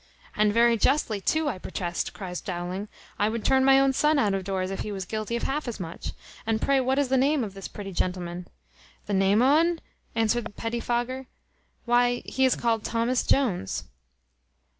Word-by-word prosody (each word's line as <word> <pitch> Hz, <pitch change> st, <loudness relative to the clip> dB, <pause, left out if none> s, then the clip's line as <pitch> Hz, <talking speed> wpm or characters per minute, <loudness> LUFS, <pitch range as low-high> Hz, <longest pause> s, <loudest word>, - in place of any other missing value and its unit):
"And 210 Hz, 0 st, +3 dB
very 235 Hz, +1 st, +4 dB
justly 225 Hz, -4 st, +1 dB
too, 315 Hz, +8 st, +1 dB
I 225 Hz, -10 st, -2 dB
protest," 175 Hz, -2 st, -3 dB
cries 180 Hz, -3 st, -6 dB
Dowling; 180 Hz, +2 st, -4 dB, 0.3 s
"I 205 Hz, -, +3 dB
would 225 Hz, 0 st, -4 dB
turn 265 Hz, 0 st, +4 dB
my 270 Hz, 0 st, +6 dB
own 270 Hz, 0 st, +3 dB
son 300 Hz, +3 st, +3 dB
out 210 Hz, -8 st, +2 dB
of 195 Hz, -1 st, -1 dB
doors, 190 Hz, -1 st, -2 dB
if 195 Hz, -, -4 dB
he 210 Hz, -, -3 dB
was 190 Hz, -2 st, -4 dB
guilty 215 Hz, +4 st, -3 dB
of 235 Hz, -, -3 dB
half 290 Hz, +1 st, -2 dB
as 235 Hz, -, -4 dB
much. 170 Hz, -2 st, -6 dB, 0.3 s
And 220 Hz, -1 st, 0 dB
pray 275 Hz, +2 st, +2 dB
what 260 Hz, +1 st, +1 dB
is 285 Hz, -2 st, +1 dB
the 265 Hz, -, +3 dB
name 280 Hz, +1 st, +2 dB
of 205 Hz, -3 st, -5 dB
this 195 Hz, -1 st, -7 dB
pretty 200 Hz, -1 st, -8 dB
gentleman?" 180 Hz, -1 st, -3 dB, 0.6 s
"The 205 Hz, -, -3 dB
name 195 Hz, +4 st, +4 dB
o' 285 Hz, +4 st, +5 dB
un?" 335 Hz, 0 st, +1 dB, 0.4 s
answered 225 Hz, -1 st, 0 dB
Petty 230 Hz, +1 st, -2 dB
fogger; 245 Hz, +2 st, -2 dB, 0.6 s
"why, 245 Hz, 0 st, +2 dB
he 265 Hz, -, +1 dB
is 260 Hz, -, +3 dB
called 230 Hz, -2 st, 0 dB
Thomas 235 Hz, +2 st, 0 dB
Jones." 220 Hz, -, +1 dB
230 Hz, 195 wpm, -26 LUFS, 195-260 Hz, 0.6 s, my